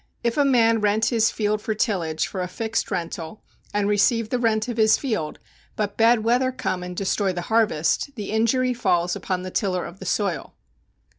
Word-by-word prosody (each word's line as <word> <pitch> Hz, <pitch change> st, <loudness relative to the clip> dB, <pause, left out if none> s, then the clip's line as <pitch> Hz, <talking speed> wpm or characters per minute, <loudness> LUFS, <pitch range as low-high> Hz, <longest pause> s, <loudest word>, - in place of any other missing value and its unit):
If 235 Hz, -1 st, 0 dB
a 290 Hz, -, +3 dB
man 230 Hz, -5 st, +3 dB
rent 210 Hz, +1 st, +2 dB
his 225 Hz, -2 st, +3 dB
field 210 Hz, -1 st, -1 dB
for 220 Hz, -, -2 dB
tillage 175 Hz, -8 st, 0 dB
for 190 Hz, -, -5 dB
a 180 Hz, -, -2 dB
fixed 220 Hz, +5 st, -2 dB
rental, 165 Hz, +2 st, -5 dB, 0.3 s
and 205 Hz, -1 st, 0 dB
receive 210 Hz, +2 st, +2 dB
the 250 Hz, -, +1 dB
rent 220 Hz, -2 st, +1 dB
of 240 Hz, -2 st, -4 dB
his 220 Hz, -1 st, +5 dB
field, 215 Hz, -, -3 dB, 0.4 s
but 205 Hz, -1 st, -2 dB
bad 230 Hz, 0 st, +4 dB
weather 250 Hz, +3 st, +2 dB
come 185 Hz, -7 st, -3 dB
and 180 Hz, 0 st, -7 dB
destroy 195 Hz, 0 st, 0 dB
the 175 Hz, -, -3 dB
harvest, 210 Hz, -, +2 dB
the 210 Hz, -4 st, -5 dB
injury 250 Hz, +3 st, +2 dB
falls 175 Hz, -7 st, +1 dB
upon 185 Hz, -1 st, -3 dB
the 185 Hz, -, -6 dB
tiller 185 Hz, -3 st, -1 dB
of 180 Hz, -, -10 dB
the 190 Hz, -, -7 dB
soil. 195 Hz, -4 st, -2 dB
215 Hz, 195 wpm, -23 LUFS, 185-230 Hz, 0.4 s, his